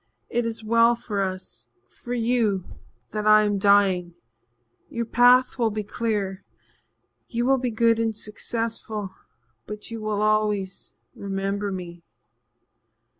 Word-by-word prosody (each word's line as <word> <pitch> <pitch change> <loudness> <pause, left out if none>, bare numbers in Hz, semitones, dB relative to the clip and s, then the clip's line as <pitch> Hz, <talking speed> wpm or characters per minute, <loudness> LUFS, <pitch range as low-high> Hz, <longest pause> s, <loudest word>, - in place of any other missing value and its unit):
It 240 -1 0
is 225 -1 -5
well 230 +2 +4
for 210 -3 -3
us 185 - -5 0.2
for 245 - -7
you 225 -5 +1 0.5
that 215 0 -2
I 215 0 +7
am 205 -1 0
dying. 190 -4 +3 0.7
Your 235 0 -3
path 245 +2 +4
will 230 -2 +3
be 215 0 -3
clear 205 -3 -2 0.8
you 240 -1 -1
will 270 +1 +3
be 250 0 -1
good 230 0 +2
and 225 -1 0
successful 220 -1 -4 0.6
but 210 +2 -8
you 225 -1 -5
will 215 -1 -1
always 210 -3 0 0.2
remember 200 +1 -3
me." 175 -2 -7
215 Hz, 125 wpm, -24 LUFS, 200-230 Hz, 0.8 s, I